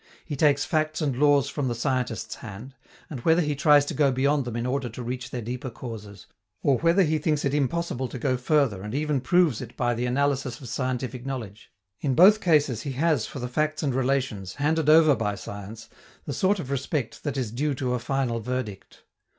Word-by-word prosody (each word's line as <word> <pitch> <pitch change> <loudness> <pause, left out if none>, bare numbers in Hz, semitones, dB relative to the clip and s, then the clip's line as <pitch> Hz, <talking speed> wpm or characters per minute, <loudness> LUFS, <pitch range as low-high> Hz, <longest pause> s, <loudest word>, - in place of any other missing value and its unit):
He 150 - -4
takes 145 0 +3
facts 155 -1 0
and 145 -5 0
laws 145 0 +4
from 140 -1 -2
the 120 - -1
scientists' 125 -1 -2
hand; 110 +5 -9 0.3
and 140 - -6
whether 165 +7 +3
he 150 -1 -1
tries 145 0 +5
to - - -4
go 145 -3 +3
beyond 140 +2 +1
them 120 -2 -5
in 120 0 -2
order 130 0 -1
to 120 +2 -7
reach 125 +1 -5
their 120 -2 -5
deeper 125 +3 -4
causes, 110 -4 -9 0.4
or 135 -3 +3
whether 170 +4 +4
he 155 -1 +1
thinks 150 -1 0
it 140 - 0
impossible 145 -2 -1
to 130 - -7
go 130 +1 0
further 125 -6 +1
and 105 +5 -5
even 150 -2 0
proves 160 -3 +2
it 125 -1 -9
by 120 0 +1
the 120 +1 -2
analysis 135 -1 0
of 130 - -10
scientific 130 0 -3
knowledge, 115 -6 -7 0.3
in 135 -3 0
both 205 - +7
cases 145 - +2
he 140 - -4
has 150 -3 +1
for - - -9
the 125 -1 -3
facts 155 +5 -1
and 140 -3 0
relations, 125 -7 -1
handed 150 +1 +1
over 155 -2 +7
by 105 -2 -2
science, 100 +3 -8 0.4
the - - -4
sort 195 +2 +2
of 140 -5 -5
respect 140 -2 -2
that 145 -2 -3
is 125 -5 -2
due 140 +4 -1
to 125 -1 -2
a 125 - 0
final 125 -2 -1
verdict. 115 -4 -5
135 Hz, 210 wpm, -26 LUFS, 120-150 Hz, 0.4 s, both